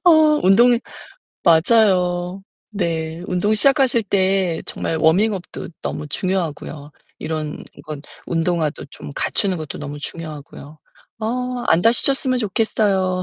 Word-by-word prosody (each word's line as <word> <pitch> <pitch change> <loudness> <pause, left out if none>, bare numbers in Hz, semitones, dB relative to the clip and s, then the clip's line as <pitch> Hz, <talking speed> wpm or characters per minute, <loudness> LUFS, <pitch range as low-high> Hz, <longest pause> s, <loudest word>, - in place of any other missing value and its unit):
어 350 - +8 0.3
운동이 235 +6 +5 0.6
맞아요. 180 0 +3 0.3
네. 165 -4 -3
운동 185 +4 +1
시작하실 265 0 +3
때 190 -3 +1
정말 165 - -2
워밍업도 185 +4 +1
너무 - - -4
중요하고요 155 -4 -3 0.3
이런 155 -1 -4 0.2
건 155 -3 -7 0.2
운동화도 165 -2 -1
좀 - - -9
갖추는 195 -3 0
것도 155 -3 -6
너무 145 0 -6
중요하고요. 150 -1 -8 0.4
어 250 +3 -2
안 165 +2 +4
다치셨으면 255 +3 +2
좋겠어요. 200 -4 0
180 Hz, 270 characters per minute, -20 LUFS, 160-215 Hz, 0.6 s, 어